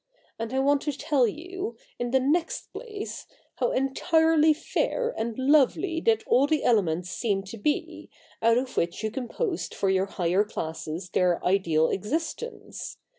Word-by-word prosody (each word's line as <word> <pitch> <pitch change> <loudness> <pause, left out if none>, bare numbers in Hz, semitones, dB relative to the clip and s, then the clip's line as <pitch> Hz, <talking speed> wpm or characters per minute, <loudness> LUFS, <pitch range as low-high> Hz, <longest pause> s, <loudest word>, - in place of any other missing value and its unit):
And 230 0 -3
I 260 - -1
want 280 +1 +3
to 295 - -1
tell 285 -3 +2
you, 370 - -5 0.2
in 245 - -1
the 265 +2 +3
next 315 +6 -1
place, 425 -4 -7 0.3
how 245 - +1
entirely 320 +4 +3
fair 475 +10 -1
and 225 0 -3
lovely 305 +5 +3
did 225 -1 +2
all 265 +3 +4
the 310 -2 +1
elements 180 -6 +2
seem 200 -4 -1
to 195 +4 -9
be, 295 +7 -2 0.3
out 230 +1 +4
of 255 +1 -3
which 170 +5 -1
you 215 - -1
composed 330 - -3
for 195 - +1
your 190 0 +1
higher 185 +1 +1
classes 165 -2 -5
their 180 -2 +2
ideal 170 -4 +3
existence. 320 - -4
255 Hz, 155 wpm, -27 LUFS, 195-315 Hz, 0.3 s, all